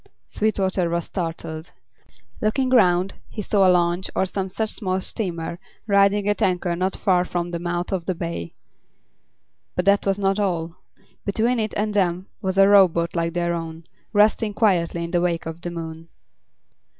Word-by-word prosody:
Sweetwater 190 -4 0
was 170 0 -1
startled. 165 -2 -5 0.7
Looking 255 +5 +1
round, 185 -6 +4 0.2
he 210 - -5
saw 195 -1 +3
a - - +6
launch, 175 0 +2
or - - +2
some 190 0 -3
such 220 +3 -2
small 190 -3 -2
steamer, 170 -4 -3 0.3
riding 200 0 +3
at 205 - 0
anchor 180 -2 +1
not 185 +2 -1
far 180 -3 +2
from 175 -1 -3
the 170 - -3
mouth 175 +1 -3
of 185 -3 -2
the 185 - 0
bay. 165 - -5 1.2
But 180 - -1
that 200 +1 +4
was 195 0 +2
not 195 0 +1
all. 170 -4 -1 0.5
Between 230 +4 +1
it 215 -1 -2
and 210 +1 -1
them 185 -2 +1 0.2
was 190 -2 -2
a 195 0 +7
rowboat 180 -4 +4
like 170 -1 0
their 170 0 0
own, 165 -1 -5 0.3
resting 210 0 +3
quietly 175 -6 +1
in 170 - -5
the 175 -1 +2
wake 170 -2 0
of 165 +1 -6
the 175 - -4
moon. 165 -1 -7
180 Hz, 170 wpm, -23 LUFS, 170-200 Hz, 1.2 s, a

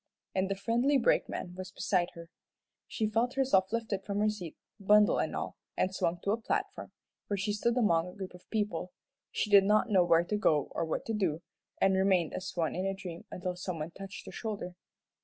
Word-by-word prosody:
and 190 0 0
the 195 - 0
friendly 240 +8 +2
brakeman 205 -6 +1
was 185 0 -7
beside 180 -2 0
her. 170 0 -9 0.6
She 220 - -1
felt 230 +4 0
herself 235 -9 +3
lifted 220 -4 -2
from 200 0 -3
her 215 0 +3
seat, 180 -6 -8 0.2
bundle 210 +1 +5
and - - -1
all, - - -4 0.2
and 185 - +1
swung 175 -2 0
to 200 - +1
a 225 +2 -1
platform, 405 - -2 0.4
where 200 - -1
she 205 +2 -1
stood 235 +4 +1
among 170 -8 +3
a 180 - -10
group 190 -2 -7
of 180 - -16
people. 210 -4 -2 0.4
She 210 - -1
did 200 -1 +8
not 215 +3 +3
know 190 -3 +6
where 170 -1 +4
to 210 +4 -1
go 150 -9 +2
or 165 - -1
what 160 - -3
to 225 - -2
do, 175 -6 0 0.4
and 190 0 +4
remained 190 -3 +2
as 185 - -4
one 165 -3 0
in 185 +2 -1
a 195 - -1
dream 175 -3 -8
until 180 0 -4
some 180 -1 -4
one 155 +2 -4
touched 195 +2 -9
her - - -8
shoulder. 205 -5 -5
195 Hz, 215 wpm, -31 LUFS, 180-215 Hz, 0.6 s, did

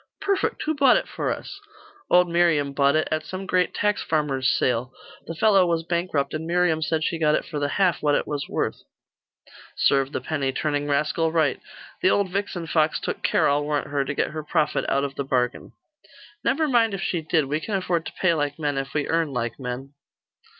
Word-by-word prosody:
'Perfect. 395 -1 -1
Who 315 - 0
bought 275 -4 +5
it - - -3
for - - -2
us?' - - -6 0.5
'Old 180 0 +5
Miriam 170 -5 +2
bought 140 +1 +3
it, 155 - +1
at 155 0 0
some 185 +4 -6
great 185 -1 +1
tax 210 0 0
farmer's 140 -4 0
sale. 125 0 0 0.4
The 165 - -5
fellow 195 -1 +4
was 165 -1 0
bankrupt, 170 -5 -1
and 160 +1 -4
Miriam 175 -2 +2
said 155 +1 0
she 165 +1 -1
got 155 -1 +3
it - - -2
for 150 -3 -5
the 145 - 0
half 180 +3 +1
what 145 -1 +2
it - - 0
was 145 -2 -4
worth.' - - -2 0.9
'Serve 135 -1 +2
the - - -2
penny 140 -4 -2
turning 145 +1 -1
rascal 155 +3 +1
right. 160 -3 +1 0.4
The 370 - +4
old 200 -3 +1
vixen 195 -3 -3
fox 155 -1 +1
took - - -4
care, - - +2
I'll 145 +1 +2
warrant 145 -1 -2
her, 140 -1 0
to 140 +1 -4
get - - 0
her 155 0 -5
profit 150 0 0
out 140 - +1
of 140 -1 -3
the 140 - -3
bargain.' 125 -2 -1 0.7
'Never 310 +3 +1
mind 230 -6 +3
if 195 - -6
she 170 - -1
did. 155 -1 +1
We 150 +3 -1
can 200 +6 -3
afford 180 -3 -1
to - - -8
pay 185 -3 +2
like 145 -2 -2
men, 145 -3 -1
if 135 +1 -6
we 150 - 0
earn 165 -2 0
like 120 -2 -3
men. 130 +2 -6
155 Hz, 215 wpm, -24 LUFS, 140-175 Hz, 0.9 s, bought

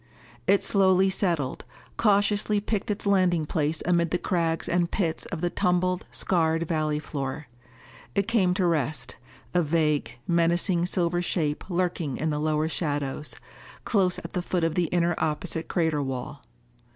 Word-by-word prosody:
It 200 +1 +4
slowly 190 -1 +4
settled, 170 -9 -1 0.3
cautiously 205 0 +2
picked 210 0 -2
its 210 0 -2
landing 185 -5 +3
place 155 +1 -1
amid 170 -1 +2
the 180 - +1
crags 170 -3 -1
and 175 -1 +1
pits 170 -5 -2
of 170 -4 -5
the 175 -1 0
tumbled, 180 -1 0
scarred 165 -2 +1
valley 155 -2 0
floor. 145 -1 -4 0.7
It 200 0 +1
came 195 -6 +2
to 185 -2 +1
rest, 145 -6 -1 0.4
a 180 - +3
vague, 155 -3 0
menacing 170 +1 +2
silver 175 -1 0
shape 160 -2 -2
lurking 175 -6 -1
in 155 +2 -1
the 150 - -1
lower 155 0 +1
shadows, 145 -3 -2 0.5
close 190 -5 +2
at 170 - -8
the 180 - -1
foot 175 -1 -1
of 165 -1 +1
the 175 +1 +1
inner 175 +1 +1
opposite 160 +1 -2
crater 160 -4 +1
wall. 135 +1 -5
170 Hz, 150 wpm, -26 LUFS, 155-185 Hz, 0.7 s, It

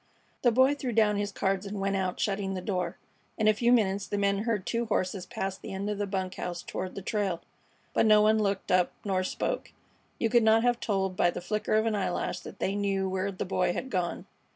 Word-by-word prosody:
The 240 - +4
Boy 260 +4 +5
threw 260 -4 -3
down 210 -2 +3
his 205 0 -1
cards 195 0 -1
and 200 0 -4
went 195 0 0
out, 185 -1 -1
shutting 195 -1 -1
the - - -2
door. 180 -2 -2 0.4
In 220 - +2
a 215 - +6
few 235 +3 +2
minutes 200 -5 +2
the 205 - -2
men 200 +1 +1
heard 210 -5 0
two 235 0 -1
horses 185 -3 -1
pass 190 0 -4
the - - -8
end 200 +2 -2
of 205 - -4
the 205 - -1
bunk 190 -1 -2
house 175 -1 -4
toward 185 - -5
the 195 - -6
trail, 195 -5 -1 0.5
but - - +3
no 215 -1 +7
one 215 +1 +4
looked 200 -2 -1
up 180 -1 +3
nor 190 -2 +1
spoke. - - -2 0.5
You 230 - +1
could 240 +1 +4
not 220 +1 +5
have 245 -1 +2
told 190 -4 -1
by 175 - +3
the - - -4
flicker 210 +4 -1
of 220 +1 +3
an 225 - +1
eyelash 185 -2 -1
that - - -10
they 195 - -1
knew 195 -1 0
where 190 +1 -1
the 185 - -4
Boy 180 -1 +1
had 260 +7 -5
gone. 180 -4 -2
200 Hz, 235 wpm, -29 LUFS, 190-215 Hz, 0.5 s, no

